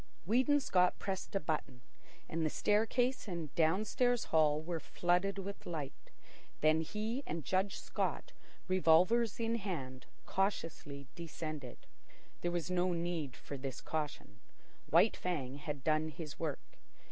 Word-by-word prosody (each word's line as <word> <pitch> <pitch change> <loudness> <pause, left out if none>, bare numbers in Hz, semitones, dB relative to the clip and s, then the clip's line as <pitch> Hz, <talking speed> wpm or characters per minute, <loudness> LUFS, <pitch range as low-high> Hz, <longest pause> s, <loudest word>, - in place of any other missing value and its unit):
Weedon 260 - +4
Scott 180 -9 +3
pressed 195 0 -4
a - - +3
button, 150 -6 -3 0.5
and 165 0 -1
the 155 - +2
staircase 225 - +2
and 170 -6 -4
downstairs 215 +9 +2
hall 155 -2 +3
were 165 +1 -3
flooded 180 +4 +1
with 195 +1 -6
light. 150 -5 -5 0.5
Then 155 +1 +5
he 215 - -2
and 165 -4 -3
Judge 190 +5 +1
Scott, - - -2 0.4
revolvers 185 +6 +4
in 230 0 +1
hand, 140 - -5 0.2
cautiously 165 -7 -2
descended. 155 -5 -6 0.6
There 175 - +1
was 175 0 -2
no 180 0 +2
need 170 -5 -2
for 140 - -7
this 130 -1 -5
caution. 150 -9 -4 0.5
White - - +5
Fang 140 -7 -2
had 145 -2 -5
done 155 +1 +2
his 155 -1 -7
work. 155 -4 -4
170 Hz, 135 wpm, -35 LUFS, 155-195 Hz, 0.6 s, Then